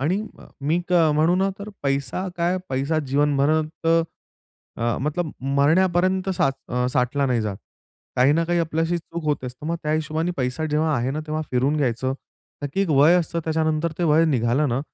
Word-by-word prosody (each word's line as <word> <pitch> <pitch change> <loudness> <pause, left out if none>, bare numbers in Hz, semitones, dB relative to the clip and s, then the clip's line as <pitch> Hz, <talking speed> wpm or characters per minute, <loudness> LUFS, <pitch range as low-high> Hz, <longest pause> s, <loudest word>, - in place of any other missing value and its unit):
आणि 175 +9 +1 0.2
अ, - - -13
क - - -17 0.2
मी 165 +3 +2
तर 165 -3 +4
म्हणू 160 +4 +3
ना, 195 +1 +2
तर 205 +1 -7
पैसा 140 +6 -1
काय? 175 +2 +1
पैसा 140 +4 0
जीवनभरात 150 +3 +1
अ, 165 -7 -3
मतलब 155 +3 -2 0.3
मरण्यापर्यंत 185 +5 +2
सा - - +3 0.2
अ, 125 0 0
साठला 130 +2 +1
नाही 125 -3 +1
जात. 105 -3 -3 0.6
काही 130 +3 +5
ना 165 +2 +2
काही 175 +1 0
आपल्याशी 165 +1 0
चूक 170 0 -8
होत 150 -3 -1
असतं. 125 +4 -7
मग 170 - -1
त्या 150 0 -1
हिशोबाने 155 +2 -1
पैसा 125 +4 -2
जेव्हा 155 0 +1
आहे 125 +3 -1
ना, 155 +3 -3
तेव्हा 155 +1 -2
फिरून 130 +4 +1
घ्यायचं. 130 -2 0 0.5
नक्की 145 +7 -2
एक 195 - +1
वय 150 +4 +6
असतं 170 -1 -1
त्याच्यानंतर, 160 0 0
ते 175 - +1
वय 160 +1 +4
निघालं 135 0 +1
ना 120 +3 0
155 Hz, 185 wpm, -23 LUFS, 135-165 Hz, 0.6 s, वय